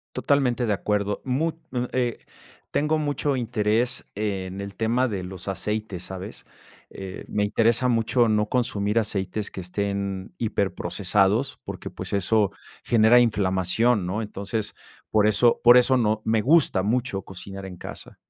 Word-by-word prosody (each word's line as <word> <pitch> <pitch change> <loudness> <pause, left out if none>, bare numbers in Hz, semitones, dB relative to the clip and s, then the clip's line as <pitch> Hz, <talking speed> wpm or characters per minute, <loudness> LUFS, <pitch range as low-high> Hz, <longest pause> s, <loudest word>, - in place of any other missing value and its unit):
Totalmente 125 -4 +1
de 105 - +1
acuerdo. 105 0 -1
Mu 145 +6 0 0.2
mm, 125 -1 -1
eh, 120 -2 -1 0.5
tengo 150 +2 +1
mucho 145 -2 -1
interés 115 +1 0
en 95 -2 -3
el 100 0 -7
tema 120 +4 +1
de 100 -5 -3
los 95 0 -8
aceites, 100 -1 -3
¿sabes? 95 +1 -8 0.4
Eh, 95 -1 -8
me 105 - 0
interesa 115 +4 +2
mucho 115 0 +2
no 105 -1 +1
consumir 110 -3 +1
aceites 100 -1 -2
que 95 - -6
estén 100 +1 -3
hiperprocesados 100 -4 0
porque, - - -7
pues, - - -7
eso 100 +1 +2 0.3
genera 115 +1 +5
inflamación, 100 0 +2
¿no? 100 +5 -2
Entonces, 105 +1 -3 0.3
por 105 -1 +3
eso 115 +3 +3
por 120 +1 +9
eso 130 +1 +4
no 110 -2 +1
me 110 -1 +2
gusta 135 - +3
mucho 115 -2 -1
cocinar 95 +1 -8
en 90 -2 -8
casa. - - -9
110 Hz, 145 wpm, -25 LUFS, 100-120 Hz, 0.5 s, por